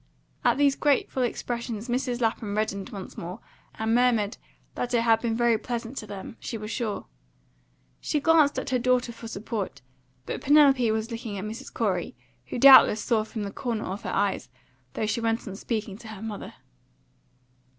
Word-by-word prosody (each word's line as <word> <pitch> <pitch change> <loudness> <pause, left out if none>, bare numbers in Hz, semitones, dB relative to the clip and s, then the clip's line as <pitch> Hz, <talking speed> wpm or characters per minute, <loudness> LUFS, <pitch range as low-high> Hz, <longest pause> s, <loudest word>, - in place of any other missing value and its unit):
At - - +3
these 285 -1 +4
grateful 280 -2 +1
expressions 235 -2 -3
Mrs. 250 0 -1
Lapham 220 -2 -1
reddened 200 -2 -2
once 195 -3 -8
more, 180 +5 -6 0.4
and 220 0 0
murmured 235 -4 +2 0.4
that 245 0 -2
it 235 - +3
had 225 -1 +3
been 230 -2 0
very 235 -1 +3
pleasant 240 +1 -4
to 215 - -8
them, 200 +2 -8
she 230 - -5
was 215 0 -6
sure. 225 -4 -3 0.9
She 300 - -1
glanced 310 -1 +4
at - - -3
her 255 - +2
daughter 250 0 +2
for 230 0 -9
support, 210 - -5 0.4
but - - -4
Penelope 275 -5 +5
was 220 +2 -1
looking 230 -3 -5
at 195 - -4
Mrs. 220 +2 -7
Corey, 190 - -1 0.3
who - - -4
doubtless 260 -4 +8
saw 230 -3 +2
her 215 - -2
from 220 -1 -5
the 200 - -4
corner 230 -2 -3
of 195 +4 -5
her - - -5
eyes, 200 -10 0 0.5
though - - -1
she 220 +2 -1
went 225 0 -1
on 195 - -5
speaking 210 -1 -4
to 230 - -11
her 220 -2 -9
mother. 215 -2 -6
230 Hz, 180 wpm, -26 LUFS, 210-245 Hz, 0.9 s, doubtless